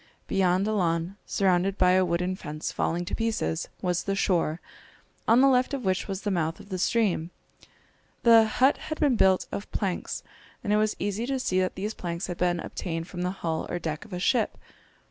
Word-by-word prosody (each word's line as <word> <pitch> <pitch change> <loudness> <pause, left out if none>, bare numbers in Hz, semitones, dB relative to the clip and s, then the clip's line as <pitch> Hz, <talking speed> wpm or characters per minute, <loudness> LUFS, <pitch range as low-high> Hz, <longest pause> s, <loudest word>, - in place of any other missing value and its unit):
Beyond 190 +1 +2
a 215 - 0
lawn, 170 -1 0
surrounded 190 0 +2
by 180 - +5
a 185 0 +4
wooden 180 +1 0
fence 155 -3 -5
falling 175 +2 -1
to - - -6
pieces, 220 - -1
was 180 -1 0
the 195 - 0
shore, 175 -4 +1 0.7
on 235 +3 +6
the 275 - +6
left 255 +1 +3
of 255 -5 -6
which 185 0 0
was 195 -1 -4
the 205 - 0
mouth 165 -3 -1
of - - -13
the 185 -2 -3
stream. 190 -5 +1 0.9
The 230 -1 +7
hut 260 +6 +3
had 310 - -6
been 285 -5 +3
built 190 -4 +4
of 200 - -5
planks, 190 -4 -2 0.4
and 210 -2 +1
it - - +4
was 215 0 +1
easy 205 +4 -2
to 270 -1 -1
see 185 -7 +1
that 185 0 0
these 210 +3 -3
planks 170 -2 -4
had 175 -2 -5
been 175 -1 +1
obtained 165 -1 -4
from 175 - -5
the 180 - 0
hull 165 -4 -3
or 175 - -2
deck 160 -3 -4
of 220 - -16
a 180 - -3
ship. 220 +5 +1
185 Hz, 205 wpm, -27 LUFS, 175-215 Hz, 0.9 s, The